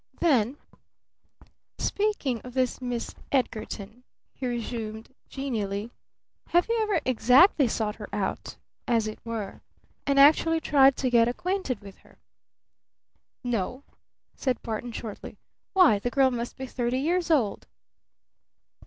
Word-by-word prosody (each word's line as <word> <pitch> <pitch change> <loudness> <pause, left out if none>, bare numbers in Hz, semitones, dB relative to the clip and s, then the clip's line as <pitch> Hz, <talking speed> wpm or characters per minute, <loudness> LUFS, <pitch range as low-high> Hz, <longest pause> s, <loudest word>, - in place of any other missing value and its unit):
Then 265 -5 +2 1.2
"Speaking 400 - -1
of 250 0 -11
this 255 -1 0
Miss 245 -2 -3 0.2
Edgarton," 230 -3 -2 0.3
he 260 - -4
resumed 230 -1 -5 0.2
genially, 220 -5 -3 0.6
"have 350 +1 +3
you 460 0 +1
ever 415 -6 +1
exactly 255 - +5
sought 215 -2 -2
her 210 - -8
out 200 -1 -3 0.3
as 230 -2 +2
it 215 0 -7
were 225 -4 -5 0.5
and 280 0 +3
actually 315 +3 +6
tried 275 -3 +5
to 255 -2 0
get 230 -1 +5
acquainted 275 - -2
with 200 -1 -12
her?" - - -23 1.3
"No," 245 +2 -2 0.5
said 255 -3 -2
Barton 230 +2 -4
shortly. 220 -2 -7 0.4
"Why, 355 - +6
the 245 - -2
girl 265 0 +3
must 240 -1 -4
be 265 - -5
thirty 245 -1 -2
years 340 +6 0
old!" 260 -11 +1
250 Hz, 125 wpm, -27 LUFS, 225-280 Hz, 1.3 s, actually